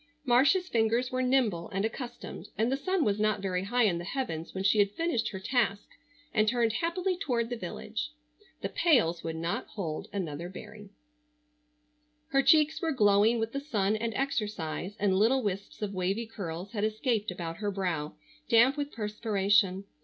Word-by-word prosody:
Marcia's 275 Hz, +9 st, +4 dB
fingers 235 Hz, -1 st, +1 dB
were 255 Hz, 0 st, 0 dB
nimble 250 Hz, -10 st, +1 dB
and 195 Hz, +2 st, -1 dB
accustomed, 240 Hz, +2 st, -6 dB
and 225 Hz, +3 st, +1 dB
the -, -, +2 dB
sun 345 Hz, +5 st, 0 dB
was 205 Hz, -1 st, +1 dB
not 215 Hz, -1 st, +2 dB
very 190 Hz, -1 st, -2 dB
high 245 Hz, +4 st, +2 dB
in 180 Hz, -6 st, +2 dB
the -, -, -5 dB
heavens 175 Hz, -, -4 dB
when 190 Hz, -, -4 dB
she 205 Hz, +2 st, +4 dB
had 200 Hz, -1 st, +5 dB
finished 235 Hz, -1 st, -1 dB
her 190 Hz, -, -6 dB
task 205 Hz, -2 st, 0 dB, 0.5 s
and 215 Hz, 0 st, +3 dB
turned 230 Hz, -1 st, +2 dB
happily 355 Hz, -, 0 dB
toward 245 Hz, -10 st, -1 dB
the -, -, 0 dB
village. 65 Hz, -, -5 dB, 0.5 s
The -, -, -2 dB
pails 230 Hz, -, +2 dB
would 165 Hz, -1 st, -3 dB
not 165 Hz, +1 st, -2 dB
hold 165 Hz, -7 st, -5 dB
another 170 Hz, -3 st, -4 dB
berry. 205 Hz, +1 st, -10 dB, 1.4 s
Her 275 Hz, -3 st, +3 dB
cheeks 310 Hz, +1 st, +4 dB
were 325 Hz, -, 0 dB
glowing 210 Hz, -2 st, +4 dB
with 225 Hz, 0 st, -2 dB
the 275 Hz, -, -2 dB
sun 215 Hz, -8 st, 0 dB
and 230 Hz, +1 st, -2 dB
exercise, 205 Hz, -, -2 dB
and 195 Hz, -2 st, +2 dB
little 250 Hz, +5 st, +3 dB
wisps 200 Hz, +1 st, -4 dB
of 200 Hz, -1 st, -3 dB
wavy 195 Hz, +5 st, -1 dB
curls 185 Hz, -3 st, -6 dB
had 210 Hz, -3 st, -2 dB
escaped 220 Hz, 0 st, 0 dB
about 170 Hz, -2 st, -5 dB
her 205 Hz, -1 st, -2 dB
brow, 180 Hz, -7 st, -2 dB, 0.3 s
damp 240 Hz, +4 st, +5 dB
with 290 Hz, 0 st, -3 dB
perspiration. 205 Hz, -3 st, +1 dB
215 Hz, 175 wpm, -29 LUFS, 190-250 Hz, 1.4 s, had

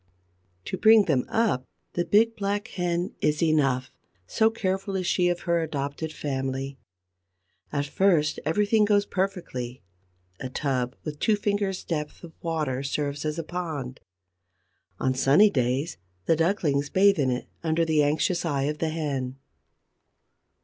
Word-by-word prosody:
To 190 Hz, -, -3 dB
bring 220 Hz, -1 st, +7 dB
them 135 Hz, -6 st, +1 dB
up, 220 Hz, -, +1 dB, 0.3 s
the 175 Hz, -, 0 dB
big, 225 Hz, +5 st, +3 dB
black 205 Hz, +3 st, -2 dB
hen 175 Hz, -2 st, -2 dB
is 150 Hz, +2 st, +1 dB
enough, 135 Hz, -5 st, +2 dB, 0.3 s
so 220 Hz, -, +3 dB
careful 195 Hz, -2 st, -2 dB
is 185 Hz, -1 st, -1 dB
she 180 Hz, -1 st, +2 dB
of 175 Hz, 0 st, -1 dB
her 170 Hz, -1 st, +1 dB
adopted 145 Hz, 0 st, -3 dB
family. 135 Hz, -1 st, -3 dB, 0.9 s
At 145 Hz, -1 st, -1 dB
first 155 Hz, -2 st, +2 dB
everything 210 Hz, +6 st, +2 dB
goes 205 Hz, -1 st, +3 dB
perfectly: 175 Hz, -, -3 dB, 0.6 s
a 130 Hz, -, -5 dB
tub 130 Hz, -2 st, -1 dB
with 150 Hz, -2 st, -6 dB
two 215 Hz, -, +3 dB
fingers' 205 Hz, -2 st, -1 dB
depth 150 Hz, -1 st, -4 dB
of 165 Hz, -2 st, -10 dB
water 155 Hz, -6 st, -1 dB
serves 145 Hz, +1 st, -2 dB
as 155 Hz, +1 st, -2 dB
a 165 Hz, -, -2 dB
pond. 155 Hz, -7 st, -5 dB, 1.0 s
On 130 Hz, -, +1 dB
sunny 145 Hz, +11 st, +5 dB
days 130 Hz, +5 st, 0 dB, 0.3 s
the 165 Hz, -, +4 dB
ducklings 155 Hz, -4 st, +1 dB
bathe 200 Hz, -2 st, +4 dB
in 135 Hz, -2 st, +2 dB
it 125 Hz, 0 st, -2 dB, 0.2 s
under 165 Hz, 0 st, +1 dB
the 155 Hz, -2 st, +3 dB
anxious 155 Hz, +4 st, +1 dB
eye 145 Hz, -5 st, 0 dB
of 150 Hz, +2 st, -2 dB
the 160 Hz, -, 0 dB
hen. 140 Hz, -5 st, -3 dB
160 Hz, 145 wpm, -26 LUFS, 140-190 Hz, 1.0 s, bring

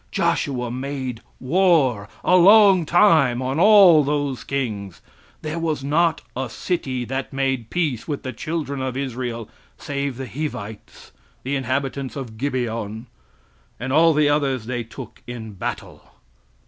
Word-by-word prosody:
"Joshua 125 Hz, -4 st, -1 dB
made 130 Hz, -2 st, -4 dB, 0.2 s
war 135 Hz, -, +2 dB
a 180 Hz, -, +4 dB
long 195 Hz, -2 st, +6 dB
time 160 Hz, -10 st, +4 dB
on 130 Hz, +3 st, -2 dB
all 190 Hz, -6 st, +7 dB
those 145 Hz, -2 st, -2 dB
kings. 105 Hz, -9 st, -4 dB, 0.4 s
There 155 Hz, +2 st, -3 dB
was 155 Hz, -4 st, -2 dB
not 160 Hz, +3 st, +1 dB
a 130 Hz, 0 st, -3 dB
city 130 Hz, -4 st, -3 dB
that 135 Hz, +2 st, -4 dB
made 135 Hz, -4 st, -1 dB
peace 150 Hz, -10 st, -2 dB
with 145 Hz, -3 st, -4 dB
the 130 Hz, -, -5 dB
children 150 Hz, -4 st, -4 dB
of 130 Hz, -1 st, -3 dB
Israel, 120 Hz, -4 st, -4 dB, 0.3 s
save 140 Hz, -2 st, -4 dB
the 130 Hz, -1 st, -5 dB
Hivites, 110 Hz, -4 st, -7 dB, 0.3 s
the 135 Hz, +2 st, -2 dB
inhabitants 135 Hz, 0 st, -2 dB
of 120 Hz, -6 st, -7 dB
Gibeon; 115 Hz, -5 st, -3 dB, 0.7 s
all 155 Hz, +7 st, +3 dB
the 150 Hz, -1 st, +3 dB
others 140 Hz, -5 st, 0 dB
they 120 Hz, 0 st, -3 dB
took 115 Hz, -, -11 dB
in 115 Hz, -3 st, -7 dB
battle. 95 Hz, -, -6 dB
135 Hz, 135 wpm, -22 LUFS, 120-155 Hz, 0.7 s, all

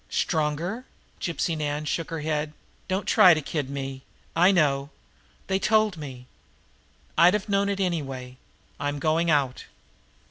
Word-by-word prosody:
"Stronger!" 165 Hz, -, -1 dB, 0.3 s
Gypsy 170 Hz, -1 st, -1 dB
Nan 150 Hz, 0 st, -2 dB
shook 165 Hz, +3 st, -2 dB
her 165 Hz, -2 st, -4 dB
head. 150 Hz, 0 st, -2 dB, 0.3 s
"Don't 190 Hz, +2 st, -1 dB
try 180 Hz, -3 st, +7 dB
to -, -, -1 dB
kid 145 Hz, -1 st, -3 dB
me! 135 Hz, -1 st, -5 dB, 0.3 s
I 180 Hz, +4 st, +6 dB
know. 140 Hz, -6 st, +2 dB, 0.6 s
They 190 Hz, 0 st, 0 dB
told 215 Hz, -1 st, +3 dB
me. 135 Hz, -5 st, -8 dB, 0.9 s
I'd 180 Hz, +4 st, +7 dB
have 210 Hz, 0 st, -3 dB
known 200 Hz, 0 st, +1 dB
it 200 Hz, 0 st, -2 dB
anyway. 135 Hz, -9 st, -3 dB, 0.4 s
I'm 145 Hz, 0 st, -2 dB
going 160 Hz, +3 st, +1 dB
out." 140 Hz, -4 st, +1 dB
155 Hz, 140 wpm, -26 LUFS, 145-185 Hz, 0.9 s, try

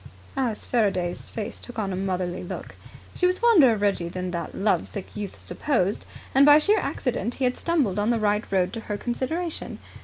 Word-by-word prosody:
Alice 245 Hz, -5 st, -1 dB
Faraday's 190 Hz, -7 st, 0 dB
face 215 Hz, -2 st, -5 dB
took 245 Hz, -, -9 dB
on 200 Hz, -3 st, -1 dB
a -, -, -2 dB
motherly 185 Hz, -1 st, -2 dB
look. 175 Hz, -, -7 dB, 0.4 s
She 360 Hz, -, +2 dB
was 365 Hz, 0 st, +1 dB
fonder 375 Hz, -, +6 dB
of 215 Hz, -2 st, -1 dB
Reggie 190 Hz, -4 st, +1 dB
than 180 Hz, +1 st, -4 dB
that 170 Hz, -2 st, -4 dB
love 205 Hz, +1 st, +1 dB
sick 200 Hz, -3 st, -8 dB
youth 205 Hz, -2 st, -5 dB
supposed, 215 Hz, -9 st, 0 dB, 0.3 s
and 270 Hz, -, +6 dB
by 290 Hz, +1 st, +9 dB
sheer 410 Hz, +8 st, +3 dB
accident 240 Hz, -2 st, -2 dB
he 270 Hz, -, -3 dB
had 250 Hz, 0 st, +2 dB
stumbled 275 Hz, -, 0 dB
on 210 Hz, +2 st, +1 dB
the 235 Hz, -, +3 dB
right 210 Hz, 0 st, +1 dB
road 185 Hz, 0 st, +1 dB
to 230 Hz, -, -4 dB
her 210 Hz, -2 st, -4 dB
consideration. 305 Hz, +9 st, -3 dB
215 Hz, 195 wpm, -25 LUFS, 190-270 Hz, 0.4 s, by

